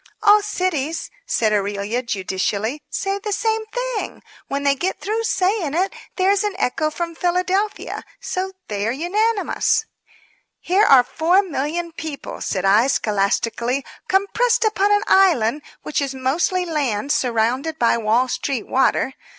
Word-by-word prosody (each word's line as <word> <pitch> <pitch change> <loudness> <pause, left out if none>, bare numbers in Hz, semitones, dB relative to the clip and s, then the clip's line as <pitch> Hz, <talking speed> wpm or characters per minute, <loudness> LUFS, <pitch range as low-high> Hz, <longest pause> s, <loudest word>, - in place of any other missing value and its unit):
"All 420 0 +7
cities," 340 -7 -2 0.2
said 215 - +1
Aurelia, 205 +3 -1
judicially, 210 +3 -2
"say 390 0 -2
the 420 +1 -4
same 445 +1 0
thing. - - -4 0.2
When 280 +1 -3
they 280 0 +4
get 360 +7 -2
through 440 +3 -2
saying 370 -7 0
it 375 +3 0 0.2
there 375 +1 +3
is 400 0 +2
an 415 -2 -2
echo 310 -2 0
from 335 +2 -4
Philadelphia. 365 +4 -1 0.2
So, 380 +1 -3
they 205 0 -2
are - - +1
unanimous." 405 - +1 0.7
"Here 390 +4 +3
are 265 -9 +7
4,000,000 335 0 0
people," 315 -4 -6
said 190 -1 -2
I, 210 +6 +5
scholastically, 230 +3 0 0.2
"compressed 450 +5 +2
upon 415 -1 +2
an 415 0 +3
island, 305 - +3 0.2
which 300 - -1
is 275 -1 -3
mostly 325 +8 0
lamb 280 -8 -1
surrounded 255 +5 0
by 235 - +3
Wall 230 +4 +2
Street 255 -1 -3
water. 265 0 +1
320 Hz, 140 wpm, -21 LUFS, 245-390 Hz, 0.7 s, All